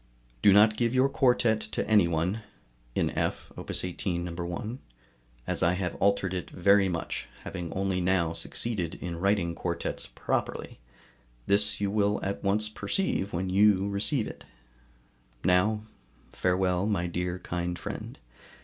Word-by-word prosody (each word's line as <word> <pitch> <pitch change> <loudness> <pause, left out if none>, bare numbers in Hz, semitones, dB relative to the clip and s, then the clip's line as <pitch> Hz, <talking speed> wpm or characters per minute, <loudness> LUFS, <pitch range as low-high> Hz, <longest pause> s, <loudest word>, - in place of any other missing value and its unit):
Do 100 - +7
not 105 +2 +6
give 120 +1 +1
your 130 +1 +5
quartet 120 -5 +3
to - - -3
any 105 -5 +5
one 85 +6 -1 0.5
[in - - +1
F, - - -2
Op. - - -9
18, 90 -1 -2
No. 90 - -4
1], 90 +8 -4 0.7
as - - +1
I 85 +2 +4
have 90 -1 -2
altered 100 -2 +2
it 90 -2 -4
very 100 +1 +4
much, 85 -2 -3 0.2
having 85 -3 -5
only 95 -1 0
now 90 -2 +2
succeeded 90 -1 -1
in 85 -2 -5
writing 95 -3 +1
quartets 85 0 -3
properly; - - -3 0.7
this 105 +1 +2
you 100 -1 0
will 105 0 +2
at 100 +1 -3
once 105 +2 +2
perceive 110 - -1
when 90 +2 -2
you 100 0 +4
receive 105 +5 0
it. - - -9 1.0
Now, 95 +4 +3 0.5
farewell, 90 +1 +1
my 100 -5 0
dear 90 +1 -2
kind 90 -1 -3
friend! - - -6
95 Hz, 145 wpm, -28 LUFS, 90-105 Hz, 1.0 s, Do